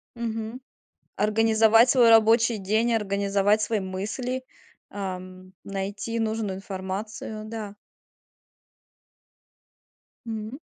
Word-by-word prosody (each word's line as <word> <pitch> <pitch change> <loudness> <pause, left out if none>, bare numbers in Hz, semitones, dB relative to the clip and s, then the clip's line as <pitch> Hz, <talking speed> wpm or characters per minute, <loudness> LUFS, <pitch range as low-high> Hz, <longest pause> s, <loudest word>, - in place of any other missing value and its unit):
Мгм, 225 0 -4 0.6
организовать 225 +2 +4
свой 245 -3 +6
рабочий 225 0 +5
день, 220 +5 +1
организовать 200 0 +1
свои 215 0 0
мысли, 215 +7 -4 0.5
ам, 185 -1 -7
найти 200 +4 -4
нужную 220 -3 -1
информацию, 200 +3 -6
да. 215 -2 -6 2.5
М. 220 +4 -5
215 Hz, 80 wpm, -25 LUFS, 195-225 Hz, 2.5 s, свой